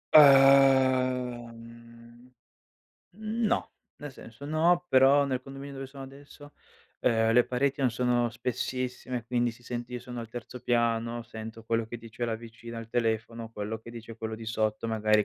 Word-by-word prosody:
Ehm 130 -3 +6 1.8
no, 220 +1 -1 0.2
nel 145 -1 -8
senso, 115 +1 -12
no 165 +4 +2
però, 135 +1 +6
nel 130 -2 -2
condominio 135 +1 -9
dove 135 0 -6
sono 135 0 -10
adesso, 145 +2 -14 0.5
ehm, 115 -2 +3
le 120 +1 +5
pareti 140 +3 -1
non 130 -2 +3
sono 120 0 +1
spessissime, 125 +1 -3
quindi 120 0 +1
si 115 +1 -17
sente 120 0 -5
io - - -2
sono 125 0 -7
al 115 - -8
terzo 120 +2 -8
piano 120 0 0
sento 115 -1 -9
quello 115 0 0
che 120 - -6
dice 115 +1 -6
la 115 -1 -1
vicina 115 0 -10
al 115 0 -8
telefono, 115 -1 -2
quello 110 0 -4
che 115 - -11
dice 115 -1 -10
quello 110 -1 -4
di 115 0 -9
sotto, 110 0 -1
magari 110 -1 +2
120 Hz, 155 wpm, -28 LUFS, 115-135 Hz, 1.8 s, Ehm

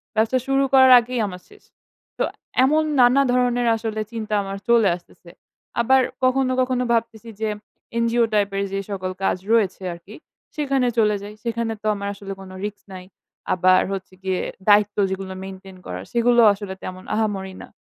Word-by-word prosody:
ব্যবসা 225 +4 +2
শুরু 270 0 +2
করার 260 -1 +7
আগেই 245 +1 -4
আমার 180 -2 -8
শেষ। 415 - -19 0.5
তো - - +1 0.4
এমন 305 +3 +3 0.2
নানা 250 +3 +6
ধরনের 245 -1 +1
আসলে 220 -1 -3
চিন্তা 215 -2 -5
আমার 195 0 -5
চলে 230 -4 +5
আসতেছে। 175 0 -20 0.5
আবার 265 +3 +4 0.2
কখনো 255 0 +2
কখনো 255 0 0
ভাবতেছি 230 -1 -2
যে 220 - 0 0.5
এনজিও 235 0 +2
টাইপের 200 -1 +1
যে 195 - -1
সকল 185 -2 -3
কাজ 190 - +1
রয়েছে 205 -5 +2
আরকি 170 +5 -13 0.4
সেখানে 275 -4 0
চলে 210 -2 +3
যাই। 205 +1 -8
সেখানে 230 -1 -2
তো - - -14
আমার 200 0 -5
আসলে 195 -1 -7
কোন 190 - -11 0.2
রিস্ক 205 -1 -6
নাই। 185 -1 -9 0.5
আবার 185 0 +4
হচ্ছে 190 -1 -6
গিয়ে 190 -1 -1 0.3
দায়িত্ব 205 0 +4
যেগুলো 190 0 -5
মেইনটেইন 190 0 -10
করার - - -6
সেগুলোও 235 -1 +5
আসলে 200 -1 -7
তেমন 185 0 -7
আহামরি 200 -3 -2
না। - - -10
215 Hz, 165 wpm, -22 LUFS, 195-240 Hz, 0.5 s, করার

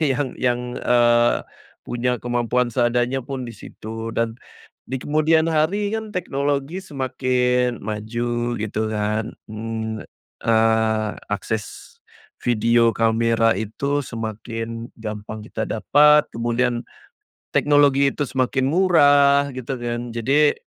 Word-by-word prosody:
Yang 145 -2 0
yang, 125 -1 +1 0.2
eee, 120 -1 +3 0.4
punya 125 +1 -1
kemampuan 120 0 0
seadanya 120 +2 +1
pun 130 0 -5
di 120 - -7
situ. 115 +1 -8
Dan, 115 +1 -1 0.4
di 130 0 -4
kemudian 155 +3 +2
hari 195 +7 +1
kan 220 -1 -5
teknologi 145 -1 -2
semakin 125 - 0
maju, 120 +3 -3
gitu 110 0 -2
kan? 105 +1 -1 0.2
Mmm, 110 0 -5 0.4
eee, 110 -1 +2 0.2
akses 105 +1 -4 0.4
video 115 -1 +2
kamera 115 -1 +2
itu 140 +7 -2
semakin 115 +1 -6
gampang 105 -1 -7
kita 110 0 -4
dapat, 150 +6 +4
kemudian 120 +1 -1 0.7
teknologi 140 -1 +4
itu 145 - -3
semakin 130 +1 0
murah 145 -5 +5
gitu 130 0 -5
kan, 120 0 -4
jadi, 140 +6 +3
120 Hz, 105 wpm, -22 LUFS, 115-140 Hz, 0.7 s, murah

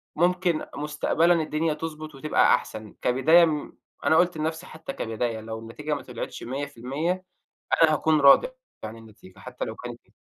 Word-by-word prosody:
ممكن 175 0 +1
مستقبلًا 150 +3 +1
الدنيا 160 -1 0
تضبُط 155 -1 -7
وتبقى 155 +3 +3
أحسن، 110 -1 -8
كبداية 160 +7 +5 0.6
أنا 160 +3 +4
قُلت 175 -2 +2
لنفْسي 160 +3 -3
حتّى 160 -2 -8
كبداية 115 0 -3
لو 110 0 -6
النتيجة 150 +7 -5
ما 140 - -6
طلعتش 125 -2 -7
100% 145 +7 -3 0.6
أنا 155 -1 +5
هاكون 155 0 +2
راضي 140 - +7 0.4
عن 110 +1 -6
النتيجة 110 -4 -16
حتّى - - -6
لو - - -6
كانت - - -8
إيه. - - -31
150 Hz, 150 wpm, -25 LUFS, 125-160 Hz, 0.6 s, راضي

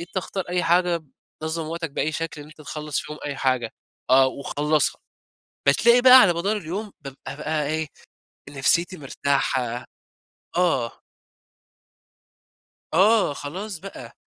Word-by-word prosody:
أنت 175 +3 -10
اختار 190 0 -3
أي 180 0 0
حاجة 175 0 +2 0.4
بتنظّم 160 +1 -3
وقتك 165 0 -4
بأي 155 +2 -1
شكل 160 -1 -4
إن 145 - -10
أنت 155 0 -16
تخلّص 150 0 -4
فيهم 150 0 -8
أي 145 -1 -4
حاجة. 130 -4 0 0.4
آه، 130 +1 +7
وخلّصها. 145 +2 -1 0.7
بتلاقي 235 +12 +5
بقى 255 0 +10
على 185 -6 +5
مدار 195 +6 -1
اليوم 200 +4 -5
بابقى 140 -1 -9
بقى 150 0 -1
إيه، 155 +1 -1 0.6
نفسيتي 145 +6 +1
مرتاحة. 130 -3 -1 0.7
آه. 160 -10 0 1.9
آه، 200 0 +4
خلاص 185 +7 -6
بقى. 145 -11 -10
155 Hz, 125 wpm, -24 LUFS, 140-180 Hz, 1.9 s, بقى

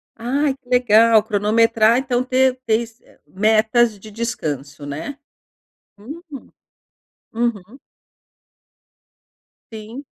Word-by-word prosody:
Ai, 270 +4 -1
que 265 -2 -27
legal. 230 -3 +4
Cronometrar, 220 +2 +2
então 250 -1 -1
ter 255 0 +1
ter 220 +1 +2
s 230 0 -12 0.2
metas 220 +2 +2
de 215 +2 -13
descanso, 150 - -5
né? 150 - -6 0.8
Uhum. 290 +12 -10 1.1
Uhum. 230 0 -3 1.9
Sim. 225 +5 -9
230 Hz, 90 wpm, -20 LUFS, 215-250 Hz, 1.9 s, legal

